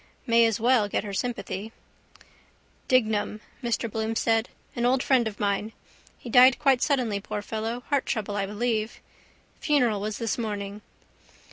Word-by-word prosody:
May 230 0 +5
as 225 -1 -1
well 235 -2 +3
get - - -1
her 205 -2 -6
sympathy. 225 -2 -4 1.2
—Dignam, 215 -4 +1 0.2
Mr 235 0 -1
Bloom 220 +1 -3
said. 225 0 +1 0.3
An 240 - -2
old 250 +2 +2
friend 255 -4 +3
of 210 - -7
mine. 205 +2 -1 0.4
He - - -12
died 250 +2 +6
quite 270 -4 +3
suddenly, 245 -8 +1
poor 205 +1 -5
fellow. 225 +3 -4
Heart 280 -2 +1
trouble, 210 -4 -2
I 200 -1 -1
believe. 220 +1 -2 0.6
Funeral 245 - +2
was 210 0 -3
this 230 0 -2
morning. 205 -2 -4
225 Hz, 150 wpm, -26 LUFS, 210-245 Hz, 1.2 s, died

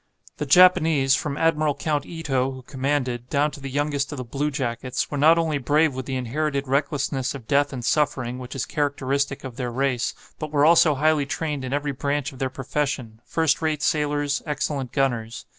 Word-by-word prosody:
The 150 - -3
Japanese, 160 -4 +5
from 140 0 -3
Admiral 155 -3 +2
Count 150 -2 -2
Ito, 135 -6 -1
who 130 - -9
commanded, 130 -2 -2
down 145 +1 +1
to - - -10
the 135 0 -6
youngest 145 +1 -1
of 145 - -5
the 125 - -5
bluejackets, 130 -2 -2
were 145 - -2
not 160 +3 +6
only 160 -3 0
brave 150 +3 +2
with 130 0 -6
the 135 - -2
inherited 140 +3 -2
recklessness 140 -1 -1
of 125 -5 -10
death 145 0 +2
and 125 -3 -5
suffering, 130 -4 0
which 125 +1 -8
is 135 - -2
characteristic 140 -1 -1
of 130 -3 -8
their 125 -2 -2
race, 130 -1 0 0.2
but 155 -2 -5
were 145 -1 +3
also 165 -2 +6
highly 150 0 +2
trained 150 -2 -3
in 130 - -4
every 145 +1 -1
branch 140 +1 -2
of 130 - -13
their 130 - 0
profession, 130 -4 -3
first 160 -3 +1
rate 155 -2 -1
sailors, 145 -2 0
excellent 145 -3 -2
gunners. 120 -5 -1
140 Hz, 190 wpm, -24 LUFS, 130-150 Hz, 0.2 s, not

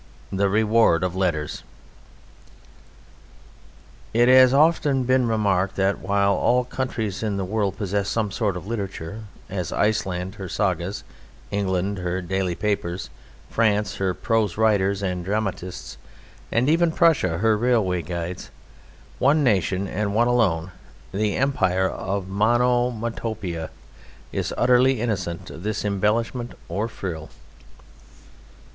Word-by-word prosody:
The 100 +1 +1
Reward 110 -4 +3
of 90 -1 -1
Letters 85 -6 -1 2.5
It 120 +1 +5
has 130 0 +8
often 145 -2 +3
been 130 0 +2
remarked 100 -4 +1
that 95 0 +1
while 100 +1 +2
all 125 +4 +2
countries 120 -6 -3
in 105 -3 -1
the 95 - -2
world 100 -1 -1
possess 100 0 -1
some 110 -3 -1
sort 100 -2 -1
of 90 - -8
literature, 100 -1 -5 0.2
as 95 -4 -4
Iceland 95 -3 0
her 95 - -5
Sagas, 95 0 -1 0.5
England 95 0 -1
her 90 +1 -2
daily 95 0 -2
papers, 95 -3 -2 0.4
France 105 -3 +1
her 95 -2 0
prose 110 -5 0
writers 100 -3 +2
and 90 -2 -2
dramatists, 95 -2 -3 0.5
and 120 +3 +2
even 165 +2 +3
Prussia 160 - +3
her 110 +3 +3
railway 105 -6 +1
guides, 85 +2 -5 0.7
one 145 +4 +4
nation 100 -4 +1
and 100 +2 -2
one 120 +2 +4
alone, 95 -8 +1 0.4
the 105 +1 0
Empire 95 -9 +1
of 95 +1 -3
Monomotopa, 110 -4 0 0.6
is - - -2
utterly 125 +1 +4
innocent 95 -7 -3
of 80 - -9
this 105 +1 -3
embellishment 115 +4 0 0.2
or 100 +6 -1
frill. 85 -8 -6
100 Hz, 120 wpm, -23 LUFS, 95-115 Hz, 2.5 s, has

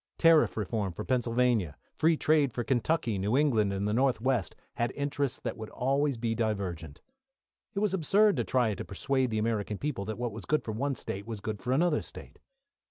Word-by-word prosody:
Tariff 165 -6 +5
reform 105 -2 -2
for - - -6
Pennsylvania, 120 - +1 0.2
free 160 0 +2
trade 150 -4 +3
for 120 - -2
Kentucky. 120 -3 0
New 105 +7 +1
England 115 -9 +3
and 100 +1 -1
the 105 - 0
North 130 +2 +2
west 120 -7 0 0.2
had 120 +1 0
interests 140 -2 -2
that - - -4
would 110 -1 -7
always 140 +1 0
be 115 0 -1
divergent. 95 -9 -3 0.7
It - - 0
was 210 -3 +1
absurd 195 +4 +4
to 120 - +1
try 125 -1 +1
and 100 - -4
persuade 130 +5 0
the 110 - -2
American 105 -2 -1
people 130 -8 -3
that 110 +1 -4
what 120 -1 -2
was 110 +1 -8
good 155 -3 +1
for 110 - -4
one 135 +5 -1
State 100 -2 -6
was 115 -3 -5
good 105 0 -4
for 125 - -2
another 155 +3 +2
State. - - -12
120 Hz, 200 wpm, -29 LUFS, 105-140 Hz, 0.7 s, Tariff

